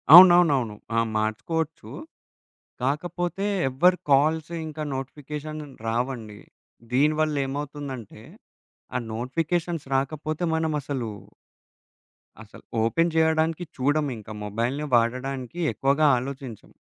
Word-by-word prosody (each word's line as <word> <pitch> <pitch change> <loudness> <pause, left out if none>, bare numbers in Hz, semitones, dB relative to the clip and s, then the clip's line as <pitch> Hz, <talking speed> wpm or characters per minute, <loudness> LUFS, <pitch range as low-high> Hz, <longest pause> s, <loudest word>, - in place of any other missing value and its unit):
అవునవునవును. 170 - +8 0.2
ఆ! - - +5 0.2
మార్చుకోవచ్చు. 115 +10 -2 0.9
కాకపోతే 175 +7 -1 0.2
ఎవ్వరి 180 +8 +4
కాల్స్ 155 +3 +3 0.2
ఇంకా 155 0 -5
నోటిఫికేషన్ 150 +3 -6 0.3
రావండి. 115 -3 -2 0.5
దీని 150 +4 +4
వల్లేమవుతుందంటే 140 -6 -3 0.7
ఆ - - +2
నోటిఫికేషన్స్ 165 +7 -2
రాకపోతే 155 +4 -1
మనమసలు 145 -7 -1 1.3
అసలు 110 - -15 0.2
ఓపెన్ 165 +9 +2
జేయడానికి 160 +1 +2
చూడము. 145 +1 +1
ఇంకా 110 0 -9
మొబైల్‌ని 120 +8 -2
వాడడానికి 130 +5 -1
ఎక్కువగా 140 +3 +3
ఆలోచించం. 130 -3 -7
145 Hz, 85 wpm, -25 LUFS, 125-160 Hz, 1.3 s, అవునవునవును